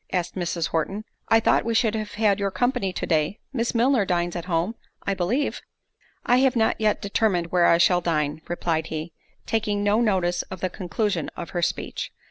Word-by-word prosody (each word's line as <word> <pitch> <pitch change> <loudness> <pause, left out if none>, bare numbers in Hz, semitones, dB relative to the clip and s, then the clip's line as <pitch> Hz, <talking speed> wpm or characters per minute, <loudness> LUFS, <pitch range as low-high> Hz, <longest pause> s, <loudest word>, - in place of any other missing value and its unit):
asked 180 -2 -1
Mrs. 175 -2 -2
Horton; 195 +6 -2 0.2
"I 225 - +6
thought 225 - +3
we 230 0 -1
should 225 -2 +3
have 215 -1 -4
had 210 -2 +2
your 200 -1 0
company 245 -2 0
to - - -4
day; 160 +4 +1 0.2
Miss 235 -1 -1
Milner 240 -1 +3
dines 175 -2 -1
at 175 -1 -4
home, 175 +3 0 0.3
I 200 - 0
believe." 195 +10 -1 0.6
"I 245 - +4
have 260 -1 +3
not 220 -1 +1
yet 215 -1 +1
determined 195 -4 +1
where 175 -1 +4
I 170 - +5
shall 175 +1 +4
dine," 155 -3 -1
replied 165 -2 -1
he, 160 +1 -5 0.3
taking 210 -2 0
no 205 +3 +3
notice 185 -5 +1
of 185 - -7
the 185 0 -2
conclusion 185 -1 -2
of 170 - -6
her 175 - -2
speech. - - -2
190 Hz, 195 wpm, -24 LUFS, 175-220 Hz, 0.6 s, I